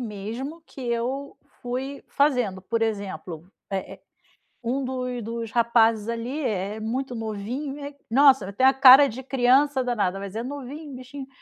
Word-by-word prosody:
mesmo 240 +9 -6
que - - -12
eu 250 +3 -3 0.3
fui 260 +3 -4
fazendo. 250 -10 +1
Por 225 +4 -2
exemplo, 190 -6 -4 0.2
eh 195 -1 -4
eh, - - -20 0.6
um 255 +4 -1
do 250 -1 -3
dos 230 0 -5
rapazes 230 -2 +3
ali 235 +5 -3
é-é 210 -4 -2
muito 245 +4 -3
novinho, 260 +7 -5 0.2
nossa, 265 -5 +5
eh, - - -6
tem 255 +6 +1
a 265 - +7
cara 270 +1 +9
de 260 +2 -7
criança 265 +2 +3
danada, 205 -6 -1
mas 200 +1 -7
é 230 - -2
novinho, 285 +2 -7
bichinho. 260 +2 -9
245 Hz, 150 wpm, -25 LUFS, 220-270 Hz, 0.6 s, cara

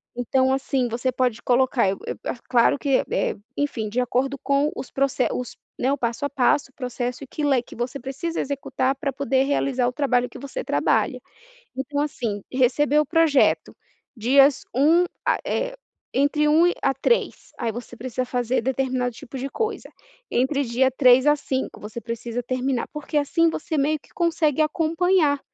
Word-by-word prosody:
Então 260 +2 +1
assim, 270 -2 0
você 240 +3 -1
pode 245 -2 0
colocar, 250 -3 +2
eh, 190 - +1
o - - -8
eu, - - -3
ah, - - -3
claro 245 +2 +4
que, 275 -3 +2
eh, - - 0 0.2
enfim, 240 -7 -2
de 235 +4 -1
acordo 260 +3 0
com 280 +2 +1
os - - -6
proce 270 -2 +1
os 250 - -5 0.2
Né, 260 +2 +1
o - - -1
passo 235 +2 -2
a 285 - -1
passo, 270 +1 +1
o - - -52
processo 250 0 -4
e - - -9
que 300 - -5
le 270 -4 +3
que - - -13
você 245 +4 -4
precisa 275 +7 -4
executar 275 -1 -1
pra 275 0 -2
poder 265 0 +1
realizar 270 -3 +1
o 250 - -2
trabalho 250 -4 +1
que - - -11
você 280 - -5
trabalha. - - +1 0.6
Então 285 +2 -2
assim, 230 -9 -3
receber 270 +3 +3
o 300 - 0
projeto. 325 -2 +3 0.4
Dias 270 +4 +4
1, 320 +7 +4 0.2
ah, - - +3
é, - - -2 0.4
entre 290 +2 +2
1 325 +3 +5
e 355 - +2
a 270 - +2
3. 470 - 0
Aí 225 - -1
você 240 +1 -8
precisa 255 +1 -3
fazer 245 -1 -1
determinado 255 -1 -1
tipo 265 - -10
de 270 +2 -4
coisa, 445 +7 -3 0.4
entre 275 +3 +1
dia 255 +2 +2
3 255 0 +5
a 295 0 +5
5 265 -2 -4
você 215 +3 -7
precisa 235 +1 -4
terminar. 255 0 -1
Porque 300 0 -5
assim, 330 +3 +2
você 315 0 -3
meio 300 +2 +1
que - - -24
consegue 320 -3 +1
acompanhar, 320 -1 +2
265 Hz, 185 wpm, -23 LUFS, 250-290 Hz, 0.6 s, 1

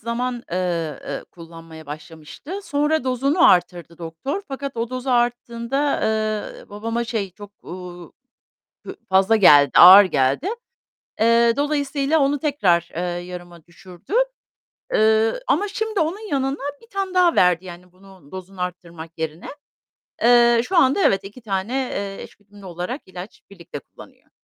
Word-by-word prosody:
zaman, 240 +1 -3
eee, 170 -5 -2
eee, - - -5
kullanmaya 165 -1 -13
başlamıştı. 160 - -9
Sonra 295 -3 0
dozunu 275 +7 +3
arttırdı 175 -2 0
doktor 170 - -5
fakat 275 -1 -6
o 230 +1 -3
dozu 255 +1 -4
arttığında, 240 +3 -1 0.6
eee, - - -17
babama 230 +3 -3
şey 220 -4 -3
çok, 205 +2 -13
uuu, 175 -2 -10 0.7
hü - - -8
fazla 190 +3 +4
geldi, 145 -9 +6
ağır 190 +3 +10
geldi. 140 - 0 0.7
Eee, 230 +1 +4
dolayısıyla 290 +1 0
onu 280 0 +1
tekrar, 195 - +1
eee, 175 - -2 0.2
yarıma 175 -2 -11
düşürdü, 175 - -13 0.8
eee, 220 +1 +3
ama 415 -3 +1
şimdi 435 -1 -3
onun 380 +8 -3
yanına 270 0 -1 0.2
1 460 - -19
tane 390 -1 -4
daha 360 -2 +4
verdi 180 0 +3
yani 180 0 -12
bunun 190 -5 -19
dozunu 185 0 -10
arttırmak 170 -2 -8
yerine. 160 +1 -5 0.7
Eee, 240 0 +5
şu 375 - -1
anda 280 +4 +4
evet 195 0 +2
iki 205 +6 -11
tane, 200 +2 -3
eee, 200 -7 -3
eş - - -13
güdümlü 205 -1 -17
olarak 180 - -5
ilaç 185 +2 -10
birlikte 170 -7 -10
kullanıyor. - - -18
205 Hz, 140 wpm, -21 LUFS, 175-270 Hz, 0.8 s, ağır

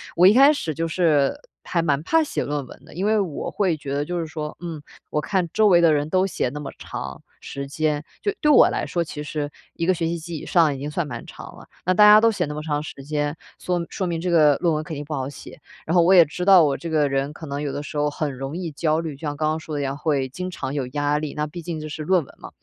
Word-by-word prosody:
我 175 - +5
一 200 - +7
开 275 +5 +7
始 165 - -3
就 165 +3 -2
是 160 -5 +2 0.3
还 170 - 0
蛮 145 -4 +1
怕 325 - +3
写 300 - -2
论 145 -1 -3
文 - - -14
的， - - -15
因 185 +4 -2
为 215 0 +3
我 180 -7 -3
会 190 -5 +1
觉 140 -2 -6
得 145 +1 -1
就 175 +3 -3
是 - - -3
说 155 -2 -6
嗯， 165 -4 -6 0.3
我 150 - 0
看 180 +2 -1
周 215 0 +4
围 175 -3 +6
的 165 -2 +5
人 145 0 0
都 185 +2 +2
写 195 - -1
那 150 +3 -7
么 140 - -6
长 65 0 -7 0.2
时 140 0 -6
间， 150 +1 -1 0.2
就 410 - 0
对 300 - +3
我 - - +7
来 - - -2
说， 170 - -1
其 155 -2 -7
实 150 0 -4 0.2
1 165 - -2
个 185 - +4
学 165 -2 -1
期 170 +1 -2
及 165 0 -6
以 - - -8
上 165 -4 +3
已 - - -8
经 145 +2 -4
算 160 +2 -2
蛮 145 - -7
长 - - -11
了， - - -14 0.2
那 185 - +3
大 210 - +5
家 210 0 +9
都 230 +1 +4
写 210 - -1
那 150 - -5
么 150 - -5
长 150 -2 -1
时 140 -2 -9
间， 145 +1 -2 0.2
说 175 -1 -1
说 190 - -3
明 170 -1 -2
这 180 +1 -2
个 155 -4 +5
论 170 -2 +1
文 155 0 -1
肯 155 +1 -6
定 145 - -5
不 155 - -5
好 135 -2 -3
写。 145 - -12 0.3
然 160 - -1
后 175 - +6
我 175 +3 +5
也 175 -3 +8
知 180 +4 -5
道 190 -3 +8
我 140 -3 +1
这 170 - -6
个 150 -3 +2
人 135 +1 -1
可 160 - -9
能 140 -1 -4
有 145 -2 -2
的 145 - -4
时 150 - -9
候 150 0 +2
很 145 -1 -3
容 135 +5 -5
易 175 -3 -4
焦 155 +2 0
虑， 160 -3 -4
就 135 - -19
像 145 -2 -4
刚 155 0 +1
刚 155 +1 -1
说 160 -1 -7
的 145 - -1
一 - - -1
样， 135 0 -3
会 145 -3 0
经 180 +7 -5
常 140 -6 -5
有 140 -3 -2
压 145 +2 0
力， 150 -1 -4
那 150 - -1
毕 170 +3 -8
竟 165 -1 -5
这 155 - -6
是 155 - -6
论 180 +1 +2
文 - - -18
嘛， - - -9
155 Hz, 320 characters per minute, -23 LUFS, 145-175 Hz, 0.3 s, 家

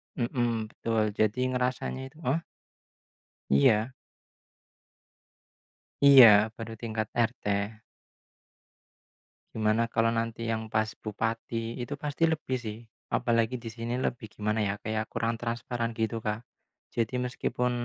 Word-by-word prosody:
Mhm 120 -3 -1
betul. 115 -1 0
Jadi 110 +3 +2
ngerasanya 125 +1 -1
itu. 150 +3 -18
Heh? 140 +6 +1 1.1
Iya. 105 - +4 2.1
Iya 135 -3 +11 0.3
baru 115 -1 -7
tingkat 110 -2 -2 0.2
RT. - - -29 2.1
Gimana 110 +1 +2
kalau 115 0 +2
nanti 115 0 -2
yang 110 0 -2
pas 110 0 0
bupati 115 +2 -3
itu 130 +4 -4
pasti 150 +3 -2
lebih 155 -5 -1
sih, 110 -2 -6 0.3
apalagi 115 +1 +1
di 115 - -5
sini 115 +1 -4
lebih 120 -3 -2
gimana 105 +1 -1
ya? 100 - -1
Kayak 110 0 -2
kurang 115 0 -2
transparan 115 0 -3
gitu, 115 0 -1
Kak. 110 +2 -3 0.5
Jadi 115 +2 0
meskipun 125 0 -1
115 Hz, 115 wpm, -29 LUFS, 110-125 Hz, 2.1 s, Iya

